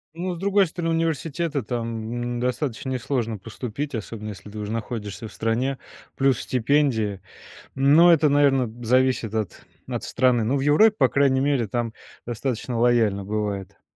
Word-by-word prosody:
Ну, 180 +2 -3
с - - -7
другой 200 +1 +3
стороны, 165 -1 -2
университет- 165 0 -1
это 140 - +1
там, 120 +1 -3
м, - - -3
достаточно 125 +1 -2
несложно 120 -3 -2
поступить, 125 +7 -6
особенно 110 -1 -5
если 105 0 -9
ты 105 - -10
уже 105 0 -4
находишься 110 -1 -5
в - - -13
стране, 125 +4 -1 0.4
плюс 135 -3 +2
стипендия, 115 -6 +1 0.5
но 150 +6 +6
это, 155 -2 +4
наверно, 135 -5 +3
зависит 125 -2 +2
от 110 -6 -4 0.2
от - - -4
страны. 125 -3 +2
Ну, 130 +5 +1
в 135 - 0
Европе, 205 +10 +5
по - - +4
крайней 135 -2 +3
мере, 135 -5 +1
там 115 +1 -2 0.3
достаточно 120 0 -3
лояльно 115 -5 +2
бывает. 100 -2 -4
125 Hz, 160 wpm, -24 LUFS, 110-140 Hz, 0.5 s, но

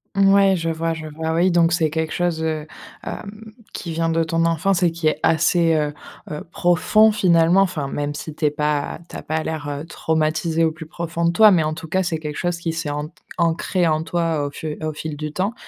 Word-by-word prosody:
Mouais, 195 0 +5
je 165 -2 -2
vois, 165 0 -1
je 160 -1 -7
vois, 160 +1 -3
oui. 175 +3 +3
Donc 170 -1 +3
c'est 160 -3 +2
quelque 160 0 -2
chose, 175 -2 -1
heu, 155 -1 -2 0.4
hem, 215 +2 -8 0.2
qui 170 - -5
vient 165 0 0
de 165 0 +1
ton 165 +1 0
enfance 175 +3 +1
et 175 - +4
qui 165 -1 -2
est 155 - +1
assez, 165 +1 +3
heu 150 -1 0 0.4
heu, 150 - -5
profond 180 +6 +4
finalement. 180 -3 +4
Enfin, 175 -7 -1
même 145 +1 -3
si 155 +1 -6
tu 155 - -2
es - - +5
pas 150 0 -1
tu - - -10
as - - -5
pas 155 +1 -2
l'air, 155 -2 -4
heu, 145 +1 -5
traumatisé 160 0 0
au 160 - +3
plus 160 0 -10
profond 170 0 -3
de 170 - +3
toi. 215 +4 +7
Mais 170 -4 +4
en 155 0 -1
tout 160 0 -8
cas, 190 +4 +1
c'est 175 -3 -1
quelque 150 -1 -6
chose 175 -1 -1
qui 170 -1 -3
s'est 165 -2 -3
ant 150 +1 -3 0.3
ancré 170 +2 +1
en 155 -1 +1
toi 165 -3 -1
au - - -3
fu 150 +1 -6
au 155 -1 -2
fil 155 0 -5
du 150 0 -4
temps, 195 +7 -1
165 Hz, 235 wpm, -21 LUFS, 155-175 Hz, 0.4 s, toi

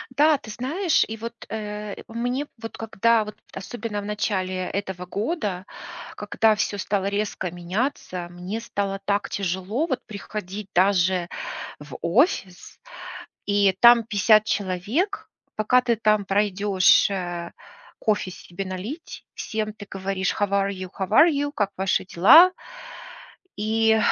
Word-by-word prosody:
Да, 300 0 +5
ты 220 - -13
знаешь, 315 - +1
и 225 0 -6
вот, 230 +2 -6 0.2
э, 210 -1 -5
э, - - -11
мне 245 +5 -2
вот 225 - -7
когда, 225 0 +2
вот 210 0 -8 0.2
особенно 210 +1 -5
в - - -8
начале 185 -3 -1
этого 190 -2 -4
года, 205 - -3 0.5
когда 215 +1 +2
всё 205 -1 -1
стало 195 0 -1
резко 200 -3 -2
меняться, 180 0 -3
мне 180 +5 -5
стало 200 -3 -3
так 200 0 0
тяжело 195 - -1
вот 260 - -1
приходить 205 -1 -7
даже 185 -1 +3 0.5
в 150 -2 -9
офис, 185 - 0 0.7
и 200 -2 +3
там 235 -1 +8
50 215 0 +4
человек. 205 - -1 0.3
Пока 250 +4 +3
ты 240 -2 +1
там 215 -2 +2
пройдешь, 200 -1 +3
э, 175 -2 -4 0.5
кофе 210 -3 0
себе 180 +2 -7
налить, 205 - -7
всем 215 -2 -3
ты 205 -1 -11
говоришь: 195 -1 -2
"How 205 -2 0
are 200 0 +1
you? 185 -1 -6
How 190 0 -2
are 310 +10 +7
you? 285 0 -1
Как 205 -6 0
ваши 190 -1 +1
дела?" 265 - +7 1.1
И 220 +1 +2
205 Hz, 135 wpm, -24 LUFS, 190-225 Hz, 1.1 s, там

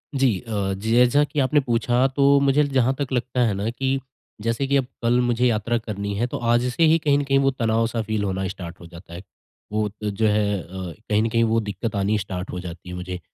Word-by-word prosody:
जी। 130 -8 +2
अ, 100 -5 -2
जी, 110 +4 -3
जैसा 125 +4 +5
की 145 0 -3
आपने 145 +3 +3
पूछा 125 0 +1
तो 140 +1 +4
मुझे 140 +2 +3
जहाँ 135 -2 +2
तक 140 -2 -3
लगता 125 0 -1
है 105 - +1
ना, 100 +3 -2
कि 135 +2 -1 0.4
जैसे 115 +5 -1
कि 140 0 +3
अब 135 - +1 0.2
कल 120 +1 +3
मुझे 120 0 +1
यात्रा 115 +1 0
करनी 100 -3 -4
है, 120 +4 0
तो - - -4
आज 120 0 +2
से 165 - +1
ही 160 +1 +5
कहीं 145 -2 +2
न 145 - 0
कहीं 135 0 +2
वो 135 0 +3
तनाव-सा 115 -1 0
फ़ील 110 -1 -2
होना 95 -1 -2
स्टार्ट 90 -3 -8
हो 85 - -12
जाता 85 0 -13
है। 85 - -7 0.5
वो 105 0 0
तो, 105 +1 -5
जो 110 +2 0
है, 105 -1 +1
अ, - - -14 0.4
कहीं 105 0 +3
न 115 - 0
कहीं 115 +1 +2
वो 115 0 +2
दिक्क़त 105 +1 -4
आनी 100 +2 +1
स्टार्ट 95 -1 -5
हो 90 - -4
जाती 90 0 -9
है 90 - -6
मुझे। 90 0 -5
115 Hz, 245 wpm, -23 LUFS, 100-130 Hz, 0.5 s, जैसा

